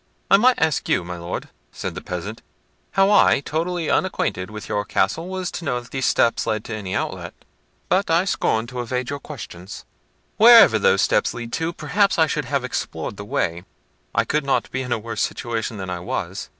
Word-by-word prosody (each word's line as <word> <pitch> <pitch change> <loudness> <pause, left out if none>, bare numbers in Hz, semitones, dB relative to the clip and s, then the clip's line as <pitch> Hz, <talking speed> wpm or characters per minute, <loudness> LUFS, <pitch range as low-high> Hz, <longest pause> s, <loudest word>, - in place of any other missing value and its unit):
"I 195 - +9
might 250 +4 +4
ask 160 -3 0
you, - - +2
my 90 0 -6
Lord," 85 +1 -5 0.2
said - - -5
the - - -7
peasant, 95 +5 -6 0.5
"how 195 +1 +4
I, 205 - +5
totally 165 +3 -2
unacquainted 95 - 0
with 105 0 -8
your 105 -1 -1
castle, 105 - 0
was 185 -1 -4
to - - -6
know 125 -6 -1
that 120 - -14
those 135 -2 -1
steps 115 0 +2
led 110 -1 -1
to 115 - -6
any 95 -3 -4
outlet? - - -4 0.5
but 190 +3 +1
I 165 +3 +3
scorn 110 -11 0
to 125 0 -5
evade 125 +2 -3
your 145 - -4
questions. 105 - -9 0.5
Wherever 230 +1 +8
those 475 0 +3
steps - - +1
lead 120 -1 -7
to, 165 +1 -1
perhaps 180 +6 +1
I 160 - +5
should 150 -2 -2
have 140 +1 -1
explored 100 -8 -4
the 100 - -7
way—I 85 -3 -3
could 150 -1 0
not 140 -1 0
be 130 - -2
in 125 -1 -6
a 120 - +2
worse 115 +1 -5
situation 115 -2 -2
than 95 -1 -5
I 90 - -3
was. 90 - -4
125 Hz, 200 wpm, -22 LUFS, 105-170 Hz, 0.5 s, I